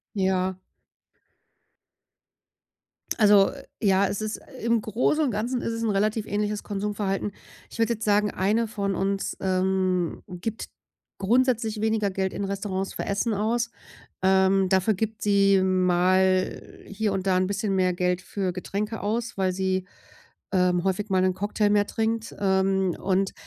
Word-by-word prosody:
Ja. 190 Hz, -1 st, 0 dB, 2.6 s
Also, 205 Hz, -2 st, +6 dB
äh, -, -, -11 dB, 0.2 s
ja, 195 Hz, -1 st, +3 dB
es 200 Hz, -, -3 dB
ist 215 Hz, 0 st, -3 dB, 0.2 s
im 235 Hz, -1 st, +2 dB
Großen 250 Hz, +9 st, +1 dB
und 260 Hz, -, +1 dB
Ganzen 240 Hz, +4 st, -2 dB
ist 230 Hz, -, -2 dB
es 230 Hz, -, -3 dB
'n 225 Hz, -, +1 dB
relativ 215 Hz, +2 st, 0 dB
ähnliches 210 Hz, 0 st, -2 dB
Konsumverhalten. 205 Hz, -1 st, -2 dB, 0.4 s
Ich -, -, -11 dB
würde 230 Hz, +1 st, +2 dB
jetzt 220 Hz, 0 st, -5 dB
sagen, 210 Hz, 0 st, +3 dB
eine 215 Hz, +5 st, +1 dB
von 200 Hz, -3 st, -2 dB
uns, 195 Hz, +1 st, -1 dB
ähm, 185 Hz, -2 st, 0 dB
gibt 200 Hz, +4 st, -5 dB, 0.5 s
grundsätzlich 225 Hz, 0 st, +1 dB
weniger 220 Hz, -2 st, +1 dB
Geld 190 Hz, 0 st, -2 dB
in 200 Hz, -, -3 dB
Restaurants 195 Hz, -1 st, -3 dB
für -, -, -4 dB
Essen 200 Hz, +3 st, 0 dB
aus. 230 Hz, +3 st, 0 dB, 0.5 s
Ähm, 190 Hz, 0 st, +4 dB
dafür 190 Hz, +3 st, +3 dB
gibt 220 Hz, +2 st, -3 dB
sie 195 Hz, -2 st, +4 dB
mal 185 Hz, 0 st, +1 dB
hier 205 Hz, 0 st, -1 dB
und 195 Hz, 0 st, -2 dB
da 185 Hz, -1 st, +3 dB
'n 185 Hz, 0 st, +1 dB
bisschen 200 Hz, 0 st, -1 dB
mehr 185 Hz, -1 st, +2 dB
Geld 180 Hz, 0 st, 0 dB
für 190 Hz, -1 st, -3 dB
Getränke 210 Hz, +4 st, -4 dB
aus, 225 Hz, +2 st, -2 dB
weil 190 Hz, -1 st, +1 dB
sie, 190 Hz, 0 st, -1 dB, 0.7 s
ähm, 180 Hz, -2 st, +2 dB
häufig 195 Hz, +2 st, -1 dB
mal 190 Hz, -1 st, +2 dB
'nen 185 Hz, 0 st, +2 dB
Cocktail 205 Hz, +1 st, 0 dB
mehr 205 Hz, 0 st, +3 dB
trinkt. 225 Hz, 0 st, -2 dB
Ähm, 190 Hz, -2 st, +1 dB
und 195 Hz, 0 st, 0 dB
195 Hz, 150 wpm, -25 LUFS, 190-215 Hz, 2.6 s, Also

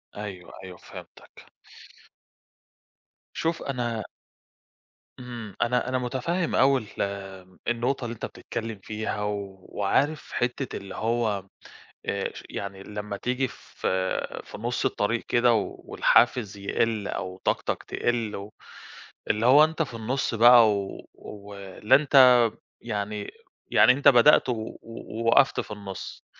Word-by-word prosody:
أيوI، 100 Hz, -4 st, -7 dB
أيوI، 90 Hz, -1 st, -9 dB
فهمتَك. -, -, -13 dB, 1.9 s
شوف 165 Hz, +1 st, -2 dB
أنا 120 Hz, -5 st, -2 dB, 1.2 s
إمم، 120 Hz, -5 st, -8 dB
أنا 125 Hz, +1 st, +1 dB
أنا 130 Hz, -, 0 dB
متفّهم 135 Hz, +8 st, -1 dB
أوي 135 Hz, 0 st, +4 dB, 0.2 s
ال -, -, +1 dB, 0.7 s
النقطة 120 Hz, +2 st, 0 dB
اللي 115 Hz, -, -4 dB
أنت 115 Hz, -, -6 dB
بتتكلّم 115 Hz, -3 st, -6 dB
فيها 105 Hz, -1 st, -4 dB
وعارف 105 Hz, +8 st, -2 dB
حِتّة 125 Hz, +1 st, -2 dB
اللي 100 Hz, -1 st, -9 dB
هو 110 Hz, -4 st, -1 dB, 0.6 s
آآ -, -, -2 dB
ش -, -, -9 dB
يعني 100 Hz, -1 st, -6 dB
لمّا 105 Hz, 0 st, -6 dB
تيجي 125 Hz, +3 st, -1 dB
في 95 Hz, -4 st, -3 dB
في -, -, -10 dB
نُص 120 Hz, +2 st, -2 dB
الطريق 115 Hz, +3 st, 0 dB
كده 120 Hz, 0 st, +4 dB
والحافز 110 Hz, 0 st, +1 dB
يقِل 105 Hz, +1 st, -1 dB
أو 95 Hz, 0 st, -5 dB
طاقتك -, -, -1 dB
تقِل 115 Hz, -3 st, -2 dB
و 100 Hz, +2 st, -9 dB, 0.8 s
اللي 110 Hz, +2 st, +1 dB
هو 145 Hz, +4 st, +8 dB
أنت 160 Hz, +1 st, +1 dB
في 135 Hz, -, -9 dB
النُص 115 Hz, +2 st, -2 dB
بقى 120 Hz, 0 st, +8 dB
و 100 Hz, -1 st, -4 dB
ولا 100 Hz, +1 st, -1 dB
أنت 135 Hz, -4 st, +7 dB, 0.4 s
يعني 105 Hz, -2 st, -4 dB, 0.4 s
يعني -, -, +7 dB
أنت 140 Hz, +2 st, +1 dB
بدأت 130 Hz, +1 st, +6 dB
و -, -, +2 dB
و 110 Hz, -1 st, -6 dB
ووقَفت 115 Hz, +3 st, +1 dB
في -, -, -12 dB
النُص، 100 Hz, -2 st, -8 dB
115 Hz, 125 wpm, -26 LUFS, 105-125 Hz, 1.9 s, هو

